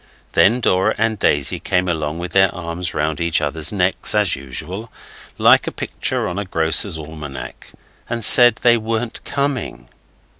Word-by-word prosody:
Then 120 +6 +3
Dora 95 -4 +1
and 110 -1 -1
Daisy 70 -2 +1
came 90 0 -1
along 80 -2 -2
with 90 +1 -6
their 95 -1 +3
arms 85 0 -5
round 75 +1 -2
each 85 -1 +1
other's 75 +2 0
necks 95 0 0
as 105 -4 +2
usual, 90 - -7 0.5
like - - +4
a - - -2
picture - - -3
on 90 - -4
a 100 - -4
grocer's 80 +1 +1
almanac, 75 -3 -9 0.4
and 120 -1 -3
said 120 +1 +7
they 120 +1 +3
weren't 115 +1 -3
coming. 140 -3 -3
90 Hz, 155 wpm, -19 LUFS, 80-110 Hz, 0.5 s, said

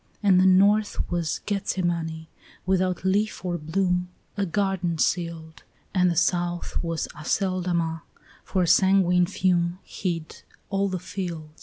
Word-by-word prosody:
And 190 -3 +5
the 185 - +5
north 205 +3 +3
was 170 -3 -1
Gethsemane, 170 -5 -2 0.4
without 185 -1 0
leaf 200 +1 0
or 175 -1 -1
bloom, 180 +3 0 0.3
A 200 -1 -1
garden 180 -2 -1
sealed; 165 -1 -2 0.3
And 180 -1 +3
the 170 - 0
south 175 0 0
was 165 -1 -2
Aceldama, 170 -1 -1 0.4
for 185 -2 0
a - - 0
sanguine 180 -1 +4
fume 175 -2 +1
Hid 170 -4 -5 0.3
all 195 0 +1
the 185 - -2
field. 170 -4 -6
180 Hz, 130 wpm, -25 LUFS, 170-190 Hz, 0.4 s, And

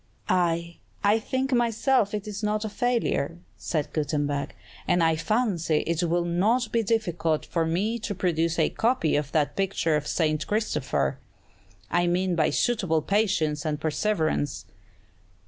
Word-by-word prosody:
"Aye, 170 -2 +1 0.3
I 205 +2 +4
think 260 +4 -2
myself 235 -2 +2
it 210 0 -5
is 210 0 -5
not 210 0 -1
a - - -2
failure," 225 - 0 0.2
said 155 -4 -3
Gutenberg; 145 -2 -1 0.3
"and 175 -2 +3
I 160 0 +3
fancy 170 -4 0
it 165 0 0
would 175 0 +1
not 215 +8 +1
be 230 - +2
difficult 175 -8 0
for 165 -2 -1
me 205 +8 0
to 210 -2 -4
produce 170 -2 0
a - - +2
copy 230 -8 +1
of 145 -1 -1
that 150 -2 +1
picture 190 -5 0
of 150 0 -2
'St. 155 -1 0
Christopher,' 215 +1 -1 0.7
I 175 0 +2
mean 180 +1 +1
by 155 -2 +2
suitable 185 -10 +1
patience 185 -8 +1
and 150 -2 -2
perseverance." 155 -3 -1
175 Hz, 145 wpm, -26 LUFS, 160-215 Hz, 0.7 s, I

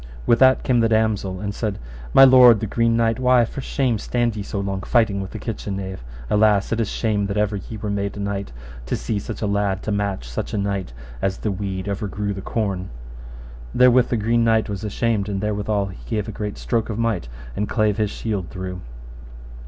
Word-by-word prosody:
With 120 - +4
that 130 0 +5
came 125 -2 +2
the 115 -1 +3
damosel, 110 -4 +1
and 100 -1 -3
said, 105 -2 -3 0.3
My 135 - +8
lord 125 -4 +8
the 110 - -2
Green 115 +2 +1
Knight, 115 0 +1
why 125 -2 +4
for 135 - -6
shame 130 -4 0
stand 120 0 0
ye 105 - -4
so 100 0 -4
long 100 -1 -2
fighting 110 -2 +2
with 95 - -6
the 110 - -7
kitchen 100 -2 -4
knave? 95 -6 -6 0.2
Alas, 105 - +3
it 115 - 0
is 115 - 0
shame 105 -3 0
that 100 +1 -3
ever 105 -1 +1
ye 110 +4 -8
were 105 0 -4
made 100 0 -2
knight, 100 -3 -3 0.4
to - - 0
see 110 -3 -2
such 110 +2 -6
a - - +2
lad 100 -2 0
to 110 - -2
match 100 -9 -2
such - - -4
a - - 0
knight, 100 -5 -2 0.3
as 95 -1 0
the 105 - -2
weed 95 -1 -4
overgrew 100 0 -3
the 95 - -6
corn. 95 -4 -2 0.9
Therewith 125 -1 +5
the 120 - +1
Green 115 +2 +2
Knight 110 -1 +2
was 100 0 -4
ashamed, 105 -1 -1
and 100 -1 -2
therewithal 105 -1 -1
he 95 - -13
gave 105 -4 -1
a - - -4
great 105 0 -5
stroke 115 -2 -1
of 110 - -3
might, 115 - -1 0.3
and 105 - -2
clave 110 -3 +1
his 105 -1 +1
shield 100 -5 -3
through. 95 -1 -6
105 Hz, 215 wpm, -22 LUFS, 100-115 Hz, 0.9 s, My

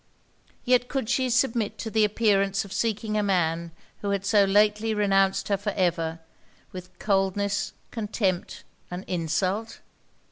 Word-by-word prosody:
Yet 250 -1 +3
could 265 -5 -3
she 260 -1 +1
submit 235 -3 +1
to 220 - -5
the 220 0 +3
appearance 200 -2 +2
of 195 - -9
seeking 220 -1 -1
a 210 - +2
man 170 -4 0 0.3
who 205 - -2
had 200 -1 -1
so 205 0 +4
lately 210 +2 +2
renounced 195 -2 +2
her 200 - +2
for 205 +1 -3
ever, 170 -3 0 0.5
with 180 -1 -10
coldness, 200 0 0 0.2
contempt, 205 -5 -2 0.3
and 180 +1 -6
insult? 185 +6 -1
200 Hz, 140 wpm, -26 LUFS, 190-220 Hz, 0.5 s, so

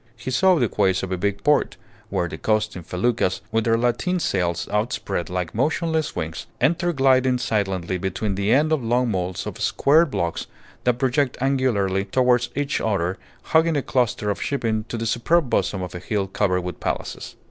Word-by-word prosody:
He 120 +3 -5
saw 185 +7 +4
the 125 -8 +2
quays 95 -3 +1
of 95 - -4
a - - +1
big 100 +2 -2
port, 150 0 +2 0.3
where 90 -3 0
the 80 - -8
coasting 110 -3 0
feluccas, 95 +3 0
with 115 0 +1
their 115 -1 +3
lateen 125 +10 0
sails 90 - -1
outspread 105 -5 -2
like 90 -2 -3
motionless 160 +5 0
wings, 80 -1 -4
enter 175 +3 +2
gliding 130 -3 +3
silently 95 -6 -1
between 95 +3 -2
the 100 +2 0
end 150 +5 +3
of 145 -5 0
long 120 +1 +1
moles 90 -2 -2
of - - -6
squared 155 +3 +3
blocks 85 -9 -2 0.4
that 125 -1 +2
project 130 +1 +1
angularly 120 -8 +1
towards 125 +3 +2
each 145 0 -1
other, 95 -3 -1 0.2
hugging 160 -1 +2
a 140 - -1
cluster 120 -4 0
of 100 - -5
shipping 115 -6 -1
to 115 - -5
the 115 - -3
superb 125 +6 +1
bosom 95 -2 0
of 90 - -6
a 90 - -5
hill 100 +2 -1
covered 95 -1 0
with 90 -2 -6
palaces. - - -4
115 Hz, 180 wpm, -23 LUFS, 95-130 Hz, 0.4 s, saw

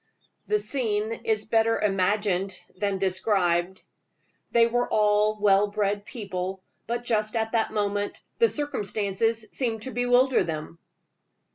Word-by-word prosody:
The 425 - +2
scene 220 - 0
is 220 -1 +1
better 225 0 +2
imagined 195 -1 0 0.2
than 200 0 -1
described. 185 -2 0 0.7
They 235 -1 +5
were 245 +1 0
all 210 0 +3
well 205 0 +4
bred 205 0 -1
people; 190 -4 -5 0.2
but 240 +1 -2
just 215 -2 0
at 225 -1 0
that 225 -2 +1
moment 205 -1 -1 0.2
the 460 -1 +5
circumstances 220 -5 -1
seemed 225 -4 -2
to 260 - -5
bewilder 245 +2 +3
them. 160 +1 -6
210 Hz, 125 wpm, -26 LUFS, 195-230 Hz, 0.7 s, They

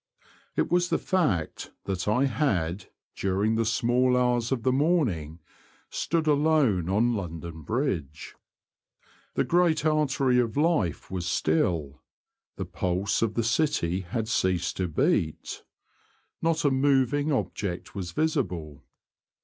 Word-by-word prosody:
It - - 0
was 175 0 +2
the 165 - +2
fact 150 - -1
that 95 -1 -3
I 125 +6 +3
had, 100 - -1 0.3
during 100 +3 0
the 115 0 +1
small 125 +2 +2
hours 125 -1 +1
of 125 -4 -1
the 130 - +3
morning, 130 - +1 0.5
stood 165 -1 -1
alone 145 - +2
on 115 +5 +2
London 85 -5 -5
Bridge. 85 - -3 1.0
The - - +2
great 170 -3 +2
artery 140 -5 +2
of 115 -1 -1
life 150 - +1
was 90 -2 -3
still; 80 -3 0 0.5
the - - -4
pulse 95 +2 -1
of 110 -2 0
the 115 - +1
city 115 - +1
had 105 +5 -3
ceased 95 -7 0
to 95 - 0
beat. 80 -1 0 0.8
Not 165 -2 +1
a 145 - +4
moving 140 +2 +2
object 100 - -3
was 90 -3 -5
visible. 90 - -2
115 Hz, 125 wpm, -27 LUFS, 90-145 Hz, 1.0 s, a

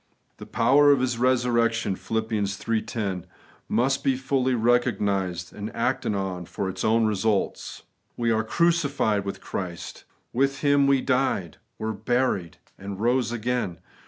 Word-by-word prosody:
The - - -10
'power 145 +5 +5
of 140 - +4
His 125 -2 -1
resurrection' 120 -4 +2
(Phil. 110 +3 -2
iii. 105 +2 -1
10) 95 -6 -4 0.4
must 130 +4 +1
be 135 -2 +2
fully 130 -1 0
recognised 105 -6 0
and 105 +1 -5
acted 115 -2 0
on 95 -2 -3
for 95 - -4
its 95 0 -5
own 115 +1 +3
results. 105 -1 -1 0.3
We 120 -1 +1
are 110 0 +2
crucified 140 -8 +1
with 100 - -5
Christ. 90 -3 -6 0.3
With 135 +2 +1
Him 145 -1 +4
we 135 -1 +4
died, 125 - 0 0.2
were 110 0 -3
buried, 110 -5 -1 0.2
and 100 0 -6
rose 120 +1 +1
again. 120 -6 -2
115 Hz, 140 wpm, -25 LUFS, 100-130 Hz, 0.4 s, power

